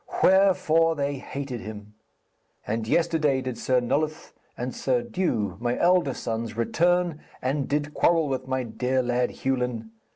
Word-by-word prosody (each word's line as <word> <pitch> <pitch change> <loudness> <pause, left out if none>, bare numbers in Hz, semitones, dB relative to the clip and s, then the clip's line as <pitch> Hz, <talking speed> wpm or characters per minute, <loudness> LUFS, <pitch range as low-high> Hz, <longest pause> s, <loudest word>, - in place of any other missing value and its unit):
Wherefore 170 -4 +4
they 140 -1 -1
hated 135 -3 -5
him. 105 -2 -9 0.7
And 110 0 -2
yesterday 155 -3 +2
did 130 -2 -5
Sir 130 -1 +2
Nulloth 155 +6 -2 0.2
and 125 +1 -3
Sir 125 -3 0
Dew, 110 - -1
my 120 +1 -1
elder 175 -6 +3
sons, 115 0 -4
return, 170 +6 +1 0.2
and 135 +2 -1
did 145 +1 -1
quarrel 165 -3 +3
with 130 -1 -3
my 130 -1 -1
dear 125 +3 -1
lad 125 0 +1
Hewlin. 125 -4 -2
130 Hz, 140 wpm, -26 LUFS, 120-155 Hz, 0.7 s, Wherefore